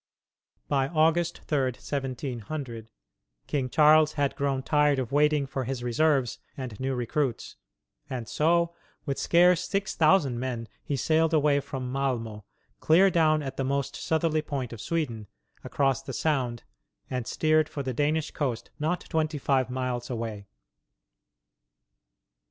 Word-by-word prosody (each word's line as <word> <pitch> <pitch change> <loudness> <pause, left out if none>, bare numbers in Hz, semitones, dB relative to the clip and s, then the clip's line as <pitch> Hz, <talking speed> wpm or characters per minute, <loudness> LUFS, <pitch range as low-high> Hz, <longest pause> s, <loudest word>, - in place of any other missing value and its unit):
By 135 -2 +1
August 165 +2 +1
3, 135 -4 0
1700, 130 -3 -5 0.6
King 135 -3 -1
Charles 155 +2 +5
had 145 -2 0
grown 135 -2 -1
tired 150 -1 +3
of 130 -1 -3
waiting 150 0 +3
for 135 -1 -4
his 130 -1 -4
reserves 135 0 +1 0.2
and 125 -6 -6
new 130 0 -1
recruits, 125 +1 -2 0.5
and 125 -4 -4
so, 170 +5 +2 0.3
with 140 -3 -2
scarce 180 +1 +4
six 195 -1 -1
thousand 155 -7 +3
men, 120 -3 -3 0.2
he 145 - -2
sailed 160 +4 +2
away 145 -2 +3
from 130 -2 -5
Malmo 115 -6 -2 0.3
clear 185 +5 +5
down 155 -3 +3
at 135 -1 -6
the 135 - 0
most 140 0 -1
southerly 160 -1 0
point 135 -6 -4
of 110 - -8
Sweden 120 -11 -2 0.4
across 135 -2 0
the 135 -1 -7
Sound, 125 -6 -1 0.4
and 125 -2 -4
steered 155 0 +2
for 140 - -4
the 130 -1 -3
Danish 150 +4 0
coast 130 -6 -3
not 160 +4 0
twenty 155 -1 -1
five 135 -2 +1
miles 125 -1 -3
away. 110 -4 -5
140 Hz, 140 wpm, -27 LUFS, 125-155 Hz, 0.6 s, Charles